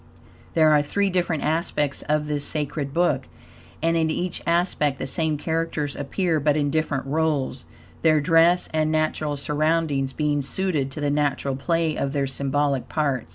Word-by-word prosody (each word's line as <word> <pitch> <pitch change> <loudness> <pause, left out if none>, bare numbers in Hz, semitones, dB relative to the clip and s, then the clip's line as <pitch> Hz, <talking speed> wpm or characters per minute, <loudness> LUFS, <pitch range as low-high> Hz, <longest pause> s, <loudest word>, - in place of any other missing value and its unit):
There 155 -2 +5
are 150 -1 +5
three 195 +7 0
different 175 -4 0
aspects 150 -2 0
of 150 0 +1
this 150 -1 -1
sacred 145 -2 -1
book, 145 -5 +1 0.6
and 165 0 +2
in 160 -1 +2
each 175 +3 -2
aspect 170 -5 +1
the - - -4
same 155 +3 +1
characters 160 -2 -2
appear, 160 +3 -1
but 150 +1 +2
in 145 -1 0
different 155 -3 -1
roles, 145 - -1 0.4
their 155 -1 +4
dress 165 +4 +4
and 155 0 +1
natural 155 -1 0
surroundings 150 -1 0
being 145 +1 0
suited 150 -2 -1
to 150 - -6
the 145 -1 0
natural 145 -2 0
play 165 +2 0
of 140 0 -2
their 140 -2 0
symbolical 140 0 -1
parts. 140 - -1
150 Hz, 160 wpm, -24 LUFS, 140-160 Hz, 0.6 s, There